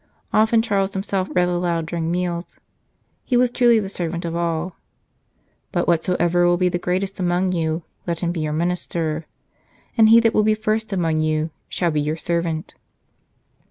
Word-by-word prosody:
Often 220 +1 +4
Charles 195 -3 0
himself 190 -1 -2
read 180 0 +3
aloud 175 -2 0
during 165 0 -3
meals; 175 0 -3 0.7
he 250 - +1
was 245 0 +3
truly 240 -2 +4
the 205 -3 -1
servant 170 -3 -3
of 165 0 -3
all. 170 +1 -2 0.5
" - - -44
But 175 -2 0
whosoever 175 +1 +2
will 175 0 +3
be 180 0 +2
the 175 - -2
greatest 190 +2 -2
amongst 180 +1 +1
you, 160 0 -1 0.2
let 170 -1 -2
him 170 -1 0
be 175 - -4
your 155 -1 -1
minister. 165 -1 -2 0.7
And 220 -2 +6
he 230 +1 +8
that 225 -1 +2
will - - +4
be 215 0 +3
first 215 0 -1
among 165 -5 0
you 155 0 0 0.2
shall 175 -2 0
be 150 -1 0
your 150 +2 -2
servant." 170 -1 -2
175 Hz, 175 wpm, -22 LUFS, 165-195 Hz, 0.7 s, he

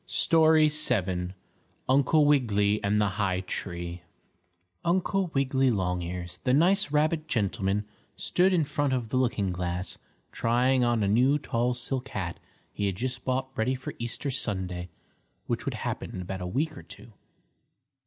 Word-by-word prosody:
STORY 160 -2 +5
VII 95 -12 -1 0.5
UNCLE 140 +3 +4
WIGGILY 105 -8 +2
AND 100 +1 +2
THE 105 - +3
HIGH 95 -2 +1
TREE 85 -2 -5 0.8
Uncle 185 +2 +1
Wiggily 135 -1 +2
Longears, 90 -3 -2
the 125 - +3
nice 185 +4 +3
rabbit 155 +2 +1
gentleman, 100 -3 0 0.3
stood 185 +2 +2
in 175 -4 +3
front 145 -1 -1
of 120 -3 -2
the 130 - 0
looking 115 -7 +1
glass 90 +1 -3 0.3
trying 125 +2 +2
on 120 -3 +2
a - - +1
new 125 +8 +4
tall 125 -3 -1
silk 125 +1 -2
hat 90 -4 -4 0.3
he 100 - -1
had 95 - -1
just 125 +3 -3
bought 130 +1 -2
ready 130 +2 +1
for 130 - -7
Easter 120 +4 -2
Sunday, 95 -7 -3 0.6
which - - -2
would - - -2
happen - - -4
in 90 - -4
about 95 +1 -5
a 90 - -3
week 150 - -1
or - - -9
two. 115 - -11
120 Hz, 155 wpm, -28 LUFS, 95-140 Hz, 0.8 s, STORY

